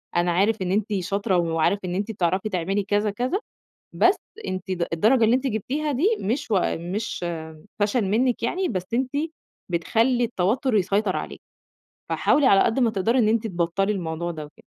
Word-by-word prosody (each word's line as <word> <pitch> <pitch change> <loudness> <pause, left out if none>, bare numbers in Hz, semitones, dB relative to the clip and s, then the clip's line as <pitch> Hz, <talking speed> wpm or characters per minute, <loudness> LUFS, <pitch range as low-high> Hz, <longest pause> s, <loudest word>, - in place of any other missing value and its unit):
أنا 175 0 +2
عارف 200 +5 +2
إن 180 -1 -1
أنتِ 210 +2 0
شاطرة 195 +2 0
وعارف 170 +3 +1
إن 180 0 -3
أنتِ 205 +4 -2
بتعرفي 190 +1 0
تعملي 195 +2 -1
كذا، 205 +1 +1
كذا، 250 - -1 0.5
بس 370 +3 +4 0.3
أنتِ 185 +1 -4
د 175 -2 -1
الدرجة 225 +9 +4
اللي 225 +2 +5
أنتِ 265 +1 -1
جبتيها 270 +7 -2
دي 350 - +2
مش 235 +5 -2
و 200 - +4 0.2
مش 180 +3 -4 0.6
فشل 210 +2 +2
منِك 230 +5 +1
يعني 365 +10 0
بس 185 -1 -3
أنتِ 255 +1 0 0.6
بتخلّي 230 +8 +1
التوتر 230 +4 0
يسيطر 200 0 +1
عليكِ، - - -6 0.7
فحاولي 290 -2 +2
على 195 -6 +6
قد 225 - +2
ما 240 -3 +3
تقدري 220 +4 +1
إن 220 -4 +4
أنتِ 225 0 +1
تبطلّي 185 +2 0
الموضوع 170 -2 -3
ده 155 -3 -6
وكده." 150 - -17
205 Hz, 175 wpm, -24 LUFS, 180-235 Hz, 0.7 s, على